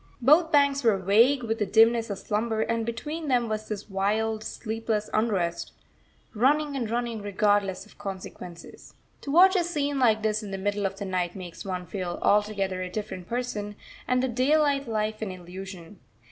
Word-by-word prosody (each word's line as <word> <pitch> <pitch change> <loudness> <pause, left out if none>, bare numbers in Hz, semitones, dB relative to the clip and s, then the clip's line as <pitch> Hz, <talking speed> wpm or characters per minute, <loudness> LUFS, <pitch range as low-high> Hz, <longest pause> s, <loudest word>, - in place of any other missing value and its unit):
Both 305 +6 +5
banks 280 -2 +3
were 225 -4 +4
vague 230 +8 +4
with 225 -1 -2
the 210 - +1
dimness 230 +2 +4
of 200 - -3
slumber, 220 +2 -1
and 230 0 -1
between 300 +7 -4
them 245 -3 +2
was 215 0 -3
this 210 -2 -5
wild, 215 +2 0
sleepless 220 -1 -3
unrest, 185 -6 0 0.6
running 285 +5 +2
and 240 -5 -2
running 235 -1 -2
regardless 205 -1 +1
of 215 - -21
consequences. 185 -3 -9 0.3
To 280 - -5
watch 375 +5 +7
a 360 - +3
scene 290 -5 -1
like 220 -4 +3
this 215 0 +1
in 210 - -7
the 195 - -4
middle 205 +1 -1
of 195 - -8
the 200 - -5
night 180 -2 -2
makes 180 -3 -8
one 185 -2 -4
feel 180 -1 -4
altogether 200 -3 +1
a 185 - -4
different 190 -2 -6
person, 220 -4 -3 0.3
and 250 0 +2
the - - +2
daylight 280 +2 +2
life 215 -1 -2
an 215 - -2
illusion. 185 0 -9
215 Hz, 175 wpm, -26 LUFS, 195-245 Hz, 0.6 s, watch